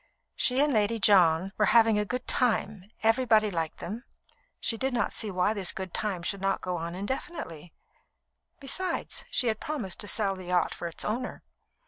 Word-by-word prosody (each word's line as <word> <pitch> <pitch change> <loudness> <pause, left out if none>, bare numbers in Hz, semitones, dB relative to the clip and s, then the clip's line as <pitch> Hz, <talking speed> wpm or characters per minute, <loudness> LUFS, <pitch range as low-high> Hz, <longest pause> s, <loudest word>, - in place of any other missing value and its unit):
She 255 +1 +2
and 295 -1 +3
Lady 215 +1 +2
John 185 -3 +4
were 210 - +4
having 225 -2 +5
a 210 - 0
"good 250 +4 -4
time," 215 -5 0
everybody 220 -2 +4
liked 165 -3 -3
them, 170 - -6
and 230 +4 -6 0.6
she 230 - 0
did 260 +2 -1
not 235 - 0
see 220 - -1
why 185 +2 +1
this 195 -4 0
good 190 -2 -6
time 195 -5 -2
should 195 +2 -3
not 195 0 +1
go 180 -1 -3
on 170 +1 -5
indefinitely. 190 - -5 0.9
Besides, 340 +6 -1
she 255 - +1
had 220 -2 0
promised 255 - -4
to 205 - -3
sell 200 -2 +1
the 185 -1 -9
yacht 180 0 +1
for 170 - -5
its 170 - -5
owner. 245 +4 -3
210 Hz, 185 wpm, -28 LUFS, 185-235 Hz, 0.9 s, having